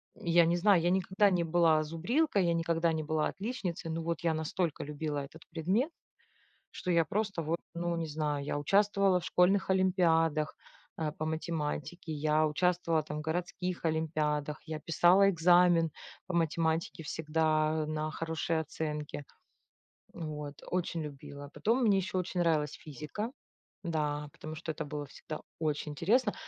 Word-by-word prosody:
Я 170 -1 +4
не 170 +1 +2
знаю, 180 -1 +5
я 175 - +2
никогда 190 +2 +3
не 175 -2 +2
была 165 -2 +3
зубрилкой, 195 - +1
я 170 - +2
никогда 165 0 +1
не 155 -1 -1
была 155 0 0
отличницей, 195 -6 -4
но 165 0 -3
вот 170 -1 -2
я 165 -1 +2
настолько 160 +1 -2
любила 150 0 -3
этот 145 +3 -10
предмет. 190 - 0 0.8
Что - - -4
я 170 -2 +4
просто 200 0 -1
вот, 165 +3 -1 0.2
ну 170 0 -1
не 165 -1 -2
знаю, 150 -2 -2
я 145 - -2
участвовала 195 +3 +3
в - - -8
школьных 190 +3 +3
олимпиадах, 165 -5 +2 0.4
э, 155 -2 -1
по 155 - -5
математике, 160 +1 -3
я 155 +1 +2
участвовала 170 0 +1
там 150 0 -5
в - - -4
городских 175 +2 -3
олимпиадах, 155 -2 0
я 155 -1 -4
писала 175 +5 +5
экзамен 175 -2 +5 0.3
по 185 - -5
математике 165 0 0
всегда 155 0 +1
на 155 0 -2
хорошие 160 0 -1
оценки. 150 -1 -4 0.9
Вот, 150 -3 -6
очень 175 -2 -1
любила. 145 -1 -8
Потом 235 +5 +1
мне 205 -3 +4
еще 190 +1 -3
очень 180 0 -2
нравилась 155 -4 +2
физика, 155 - -6 0.5
да, 150 -3 -1
потому 155 -1 -8
что 160 - -4
это - - -4
было 145 0 -5
всегда 155 +2 -8 0.2
очень 150 -1 -1
интересно. 210 - +2
165 Hz, 150 wpm, -31 LUFS, 155-180 Hz, 0.9 s, знаю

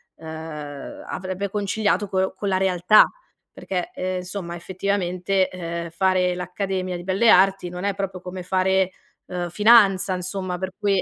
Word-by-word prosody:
uhm, 155 -3 -8
avrebbe 185 +2 -4
conciliato 205 0 0
co 190 0 0
con 200 - -2
la 190 - +2
realtà. 190 +2 +5 0.5
Perché, 180 -2 -4
ehm, 185 0 -2
insomma 180 -1 -5
effettivamente, 185 +1 -1
ehm, 170 -1 -5
fare 180 +1 +1
l'accademia 185 +1 -3
di 175 - -6
belle 195 +5 +2
arti 190 -1 +4
non 180 +1 -6
è 200 -1 0
proprio 195 -2 -4
come 180 0 -7
fare, 190 0 +2 0.3
uhm, 175 -1 -4
finanza 200 -1 +5
insomma 185 0 -3
per 190 +1 -3
cui 200 -2 +1
185 Hz, 145 wpm, -23 LUFS, 180-195 Hz, 0.5 s, realtà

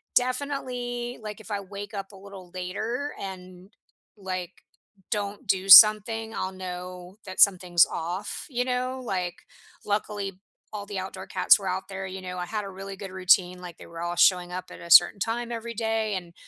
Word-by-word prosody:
definitely, 250 -2 -2
like, 215 0 -7
if 220 - -11
I 205 - -1
wake 200 +2 -9
up 195 -1 -6
a - - -12
little 190 -2 -12
later 220 +10 -4
and, 185 0 -9 0.5
like, 185 -1 -6 0.5
don't 205 +3 -3
do 190 0 0
something, 220 +2 +8
I'll 185 - -3
know 180 0 -8
that 185 -1 -8
something's 180 -3 +5
off, 175 +5 -5
you 245 -2 -1
know? 255 +1 -2
Like, 185 -7 -4 0.4
luckily, 205 -2 -3 0.3
all 205 -1 -5
the 200 -1 -5
outdoor 185 +1 -7
cats - - +5
were 195 -2 -7
out 185 +1 -3
there, 195 -1 -6
you 190 0 -7
know, 180 0 -6
I 180 - -3
had 210 +2 -4
a - - -7
really 195 +1 -8
good 195 -1 -8
routine, 185 -1 +3
like, 175 -2 -9
they - - -13
were 165 0 -9
all 175 0 -3
showing 180 0 +4
up 185 +1 -6
at - - -11
a 170 - -9
certain 175 +4 +8
time 235 +2 -2
every 230 0 -5
day, 220 -1 -1
and, 175 -2 -7
195 Hz, 185 wpm, -26 LUFS, 185-220 Hz, 0.5 s, something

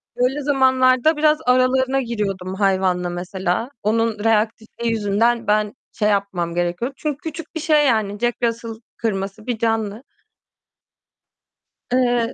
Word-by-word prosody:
Öyle 255 +4 0
zamanlarda 260 +1 +3
biraz 305 0 +4
aralarına 260 +1 +3
giriyordum 195 -6 -3
hayvanla, 190 -2 +1
mesela. 180 +5 -2
Onun 220 0 0
reaktifliği 225 +1 0
yüzünden 225 +2 +1
ben 210 0 +1 0.2
şey 210 -2 +1
yapmam 190 -4 -1
gerekiyordu 175 +9 -1
çünkü 300 -3 -3
küçük 320 +2 -8
bir 320 - -2
şey, 305 -1 +3
yani, 210 -4 0
Jack 240 +1 0
Russell 230 0 -1 0.3
kırması 200 0 -3
bir 245 -2 -1
canlı. 225 0 -1 1.9
Eee 245 -1 +2
225 Hz, 120 wpm, -21 LUFS, 200-255 Hz, 1.9 s, biraz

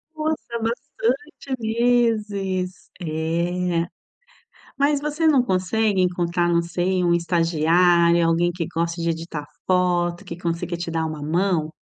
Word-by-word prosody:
Nossa. 310 0 -1 0.2
Bastante 260 +4 -2
meses. 215 -5 0
Eh. 170 +2 -1 0.9
Mas 285 0 +2
você 300 +2 -1
não 280 -5 +5
consegue 195 0 +1
encontrar, 175 -1 +1
não 170 0 +3
sei, 180 +2 0
um 170 0 +3
estagiário, 170 0 +3
alguém 170 +1 +2
que 170 -1 -3
goste 170 +1 -2
de 170 0 0
editar 165 -2 -5 0.2
foto, 175 -1 +1
que 170 - -7
consiga 170 0 -3
te 170 0 -4
dar 160 -1 -1
uma 155 -2 -6
mão? 165 0 0
175 Hz, 125 wpm, -23 LUFS, 170-210 Hz, 0.9 s, não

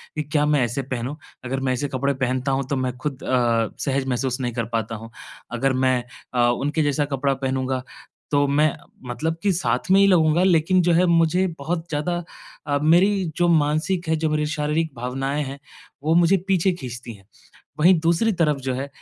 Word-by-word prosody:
कि, 150 - -1
क्या 150 0 0
मैं 145 -4 +2
ऐसे 120 +4 -2
पहनूँ? 130 +2 -4 0.3
अगर 135 +2 -2
मैं 130 -1 0
ऐसे 140 +3 -2
कपड़े 140 +1 -1
पहनता 130 +1 -1
हूँ 135 +1 0
तो 140 - 0
मैं 130 -1 -2
खुद 140 -1 -5
अ, 120 -3 +1 0.2
सहज 135 -1 0
महसूस 130 +1 -1
नहीं 120 -2 -2
कर 115 -1 -2
पाता 115 0 -1
हूँ। 115 +1 -9 0.4
अगर 130 +2 0
मैं 125 -1 +2 0.3
अ, 120 -1 +3
उनके 145 +6 0
जैसा 145 0 +1
कपड़ा 135 +1 +1
पहनूँगा 130 -1 -2 0.5
तो 145 0 +3
मैं 150 +2 +3 0.4
मतलब 160 +6 -2
कि 200 - +3
साथ 185 +1 -1
में 195 - +6
ही 200 - +6
लगूँगा 165 -2 +4
लेकिन 180 0 +3
जो 175 0 +2
है 180 +2 +4
मुझे 170 +2 +3
बहुत 165 +3 -3
ज़्यादा 175 +3 -2 0.4
अ, 145 0 +1
मेरी 190 +5 +4
जो 175 0 +2
मानसिक 160 +3 +1
है, 160 - +3
जो 155 0 -1
मेरी 150 0 0
शारीरिक 150 +1 -1
भावनाएँ 135 +4 -2
हैं 135 +1 -7 0.4
वो 160 +2 +2
मुझे 175 +3 +5
पीछे 190 -1 +2
खींचती 125 -7 -7
हैं। 95 -2 -17 0.5
वहीं 180 +4 +6
दूसरी 170 +7 +2
तरफ़ 155 -5 +1
जो 130 -1 -2
है, 135 +2 -4
145 Hz, 195 wpm, -23 LUFS, 130-165 Hz, 0.5 s, में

